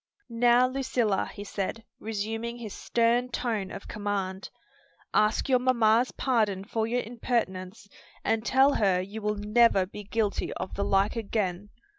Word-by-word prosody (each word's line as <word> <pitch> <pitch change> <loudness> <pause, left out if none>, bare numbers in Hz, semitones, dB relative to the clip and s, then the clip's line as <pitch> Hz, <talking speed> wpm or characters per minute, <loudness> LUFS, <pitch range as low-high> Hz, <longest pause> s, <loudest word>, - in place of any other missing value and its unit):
"Now, 240 +1 +5
Lucilla," 255 -6 0
he 205 - -8
said, 205 +2 -4 0.2
resuming 225 +2 -4
his 220 -4 -7
stern 240 +1 +1
tone 225 -5 -2
of - - -8
command, 200 -2 -3 0.6
"ask 215 +5 +2
your 255 -2 +4
mamma's 240 -1 +3
pardon 215 -7 0
for 220 +1 -2
your 245 +2 0
impertinence, 210 -4 -3 0.4
and 225 0 +1
tell 265 +4 +4
her 195 -4 +2
you 200 +4 -6
will 210 0 0
never 210 -1 +4
be 210 +2 -9
guilty 210 0 -1
of 185 - -5
the 200 - -1
like 195 +3 +2
again." 205 -3 -2
220 Hz, 145 wpm, -28 LUFS, 200-235 Hz, 0.6 s, Now